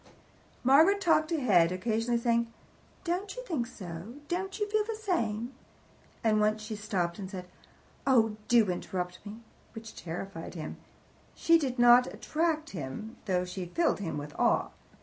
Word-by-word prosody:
Margaret 315 Hz, +10 st, +6 dB
talked 325 Hz, -3 st, +2 dB
ahead, 200 Hz, -, +4 dB
occasionally 225 Hz, +5 st, 0 dB
saying, 235 Hz, 0 st, +1 dB, 0.5 s
"Don't 375 Hz, +3 st, -2 dB
you -, -, -6 dB
think 280 Hz, -, -2 dB
so? 185 Hz, 0 st, -8 dB
don't 380 Hz, +3 st, -3 dB
you 420 Hz, -, 0 dB
feel 425 Hz, 0 st, +1 dB
the 445 Hz, +1 st, -4 dB
same?" 240 Hz, -, -1 dB, 0.7 s
And 215 Hz, -2 st, +3 dB
once 215 Hz, 0 st, +1 dB
she 215 Hz, 0 st, -5 dB
stopped, 190 Hz, -5 st, -2 dB
and 190 Hz, -2 st, -5 dB
said 185 Hz, -2 st, -6 dB, 0.6 s
"Oh, 225 Hz, -5 st, +4 dB
do 230 Hz, -5 st, +4 dB
interrupt 180 Hz, 0 st, -4 dB
me!" 210 Hz, +2 st, -9 dB, 0.3 s
which 225 Hz, -1 st, -9 dB
terrified 175 Hz, +1 st, -6 dB
him. 155 Hz, -2 st, -6 dB, 0.6 s
She 335 Hz, 0 st, +4 dB
did 265 Hz, -4 st, -2 dB
not 240 Hz, +1 st, +6 dB
attract 315 Hz, 0 st, -1 dB
him, 175 Hz, -, -6 dB
though 180 Hz, -3 st, +1 dB
she 180 Hz, 0 st, -5 dB
filled 330 Hz, -, +1 dB
him 170 Hz, -6 st, -3 dB
with 145 Hz, 0 st, -6 dB
awe. -, -, +3 dB
225 Hz, 150 wpm, -30 LUFS, 185-310 Hz, 0.7 s, Margaret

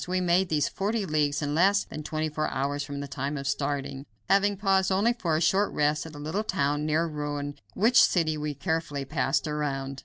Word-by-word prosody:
We 185 Hz, +1 st, 0 dB
made 180 Hz, +1 st, +2 dB
these 150 Hz, -3 st, +1 dB
forty 205 Hz, +2 st, -2 dB
leagues 150 Hz, -3 st, 0 dB
in 145 Hz, 0 st, -1 dB
less 195 Hz, +5 st, +4 dB
than 155 Hz, -, -8 dB
twenty 155 Hz, +1 st, -2 dB
four 155 Hz, 0 st, -2 dB
hours 140 Hz, +2 st, -2 dB
from 140 Hz, 0 st, -5 dB
the 140 Hz, -, -5 dB
time 140 Hz, +2 st, -3 dB
of 140 Hz, 0 st, -4 dB
starting; 140 Hz, -1 st, -2 dB, 0.2 s
having 200 Hz, 0 st, +3 dB
paused 190 Hz, -1 st, +2 dB
only 205 Hz, +5 st, +3 dB
for 170 Hz, -10 st, -1 dB
a -, -, -1 dB
short 190 Hz, +5 st, +2 dB
rest 150 Hz, +2 st, +1 dB
at 160 Hz, -, -11 dB
a -, -, -8 dB
little 155 Hz, +8 st, -2 dB
town 150 Hz, -7 st, 0 dB
near 155 Hz, +2 st, +2 dB
Rouen, 145 Hz, -2 st, -4 dB, 0.2 s
which 235 Hz, +3 st, +5 dB
city 165 Hz, -7 st, +3 dB
we 150 Hz, -1 st, -3 dB
carefully 160 Hz, -2 st, -2 dB
passed 135 Hz, +2 st, 0 dB
around. 135 Hz, -3 st, -3 dB
155 Hz, 210 wpm, -27 LUFS, 145-185 Hz, 0.2 s, which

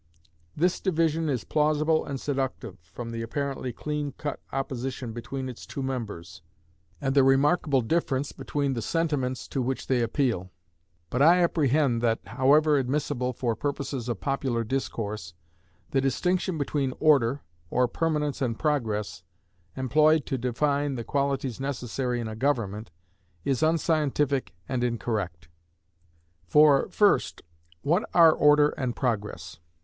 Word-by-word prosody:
This 180 Hz, +4 st, +2 dB
division 165 Hz, -3 st, +1 dB
is 125 Hz, -6 st, -1 dB
plausible 155 Hz, +1 st, +2 dB
and 140 Hz, -2 st, -4 dB
seductive, 130 Hz, -8 st, -3 dB
from 115 Hz, +9 st, -8 dB
the 115 Hz, 0 st, -4 dB
apparently 135 Hz, +2 st, -3 dB
clean 150 Hz, +2 st, -4 dB
cut 145 Hz, +1 st, -5 dB
opposition 130 Hz, -3 st, -4 dB
between 130 Hz, +3 st, -5 dB
its 125 Hz, -2 st, -9 dB
two 140 Hz, -, -5 dB
members, 100 Hz, -9 st, -5 dB, 0.6 s
and 135 Hz, -2 st, -1 dB
the 140 Hz, -1 st, +5 dB
remarkable 140 Hz, +1 st, +3 dB
difference 140 Hz, +1 st, 0 dB
between 140 Hz, 0 st, -2 dB
the 120 Hz, -, -3 dB
sentiments 135 Hz, -3 st, -1 dB
to 135 Hz, -, -1 dB
which 130 Hz, +1 st, -2 dB
they 130 Hz, -2 st, +1 dB
appeal. 115 Hz, -6 st, 0 dB, 0.6 s
But 125 Hz, -, 0 dB
I 175 Hz, +4 st, +6 dB
apprehend 145 Hz, -6 st, +2 dB
that 115 Hz, -1 st, +2 dB
(however 140 Hz, -, +3 dB
admissible 130 Hz, -1 st, -1 dB
for 120 Hz, -2 st, -2 dB
purposes 140 Hz, -1 st, -3 dB
of 120 Hz, -, -2 dB
popular 135 Hz, -4 st, -1 dB
discourse) 105 Hz, -8 st, -4 dB, 0.6 s
the 135 Hz, -, +2 dB
distinction 180 Hz, +6 st, 0 dB
between 140 Hz, -2 st, -1 dB
Order, 140 Hz, -4 st, +3 dB, 0.3 s
or 125 Hz, +5 st, +2 dB
Permanence 150 Hz, +1 st, -1 dB
and 115 Hz, -4 st, -1 dB
Progress, 110 Hz, -, -1 dB, 0.6 s
employed 150 Hz, +3 st, +3 dB
to 135 Hz, -, -2 dB
define 140 Hz, +3 st, 0 dB
the 120 Hz, -, -4 dB
qualities 140 Hz, -2 st, -1 dB
necessary 125 Hz, -2 st, -2 dB
in 115 Hz, -, -3 dB
a 110 Hz, -, -5 dB
government, 110 Hz, -5 st, -1 dB, 0.6 s
is 135 Hz, -3 st, 0 dB
unscientific 150 Hz, -, +1 dB
and 125 Hz, -2 st, -1 dB
incorrect. 105 Hz, -9 st, -2 dB, 1.0 s
For, 150 Hz, -, +5 dB
first, 150 Hz, -, +2 dB, 0.4 s
what 175 Hz, +8 st, +1 dB
are 165 Hz, -2 st, +8 dB
Order 150 Hz, 0 st, +5 dB
and 130 Hz, -5 st, -3 dB
Progress? 105 Hz, -, -3 dB
135 Hz, 135 wpm, -27 LUFS, 120-150 Hz, 1.0 s, are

